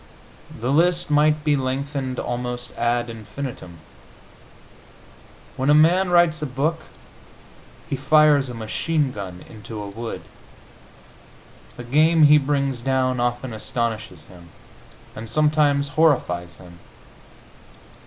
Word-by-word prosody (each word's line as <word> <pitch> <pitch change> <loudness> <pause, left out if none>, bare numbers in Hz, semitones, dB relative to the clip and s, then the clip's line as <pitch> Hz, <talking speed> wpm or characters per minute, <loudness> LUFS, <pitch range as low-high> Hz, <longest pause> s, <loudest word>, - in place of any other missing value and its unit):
The 120 +4 -2
list 170 +2 +2
might 150 +1 +3
be 150 -1 +2
lengthened 135 0 -3
almost 125 0 -4
ad 120 0 0
infinitum. 115 -4 -8 1.8
When 130 +2 -1
a 145 - +6
man 175 +5 +4
writes 175 -2 +3
a 150 - -2
book 150 +6 -2 1.1
he 150 - -2
fires 145 -1 +4
a 120 - -7
machine 140 +6 -1
gun 95 -5 -8
into 110 0 -9
a 105 - -6
wood. 115 +3 -7 1.5
The 120 - -7
game 155 +6 +3
he 150 0 +7
brings 140 -3 -1
down 130 -1 0
often 120 0 -2
astonishes 110 -6 -4
him, 85 0 -16 0.7
and 110 0 -8
sometimes 145 +1 +2
horrifies 90 - +1
him. 85 -2 -15
130 Hz, 115 wpm, -22 LUFS, 115-150 Hz, 1.8 s, he